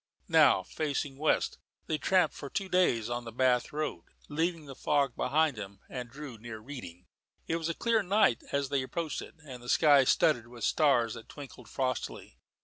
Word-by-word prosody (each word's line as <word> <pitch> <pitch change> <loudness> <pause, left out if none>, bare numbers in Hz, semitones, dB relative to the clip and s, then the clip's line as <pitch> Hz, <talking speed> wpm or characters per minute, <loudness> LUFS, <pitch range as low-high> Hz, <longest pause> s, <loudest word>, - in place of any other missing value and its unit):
Now, - - +5
facing 145 -2 -3
west, 155 - +1 0.3
they 155 - -1
tramped 180 -4 +3
for 140 - -7
two 195 +5 -2
days 175 -12 +2
on 120 0 -3
the 115 - -7
Bath 125 0 +2
road, 150 - -3 0.3
leaving 165 +1 -1
the 140 - -8
fog 140 -1 +1
behind 150 +1 +2
them, 100 -2 -8
and 125 -2 -6
drew 140 -3 -9
near 115 0 -7
Reading. 110 -8 -9 0.4
It 165 - -1
was 165 0 -3
a 170 - -2
clear 230 -2 +2
night 200 - +3
as 140 -1 0
they 140 -2 +1
approached 155 +4 -3
it, - - -11
and 125 -4 -9
the 120 - -9
sky 145 -2 +6
studded 120 -1 +3
with 120 -1 -10
stars 125 -7 +3
that 115 -2 -10
twinkled 135 -4 -11
frostily. 130 -2 -3
140 Hz, 185 wpm, -30 LUFS, 120-155 Hz, 0.4 s, sky